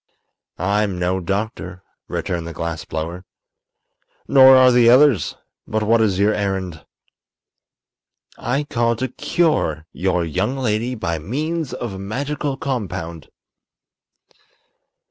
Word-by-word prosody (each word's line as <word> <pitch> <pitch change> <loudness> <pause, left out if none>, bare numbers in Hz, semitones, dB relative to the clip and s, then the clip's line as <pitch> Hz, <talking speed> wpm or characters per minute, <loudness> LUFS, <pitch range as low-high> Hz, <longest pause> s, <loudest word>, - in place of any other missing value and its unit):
"I'm 100 +1 0
no 90 +1 0
doctor," 95 -1 -4 0.2
returned 85 -2 -3
the 85 - -6
glass 85 -2 -4
blower. 85 +3 -5 1.0
"Nor 130 -1 +8
are 130 -1 +7
the 120 -1 +5
others. 130 -3 +4 0.3
But 110 0 -1
what 115 +2 +3
is 100 -4 +2
your 105 +2 +3
errand?" 95 -6 -3 1.5
"I 135 +4 -1
called 115 -4 0
to 130 +2 -2
cure 125 - 0
your 90 -2 0
young 95 - -1
lady 120 0 -1
by 85 -7 -3
means 150 - -3
of 120 -4 -5
a 95 - -7
magical 135 +7 -3
compound." 95 - -4
105 Hz, 115 wpm, -20 LUFS, 90-130 Hz, 1.5 s, Nor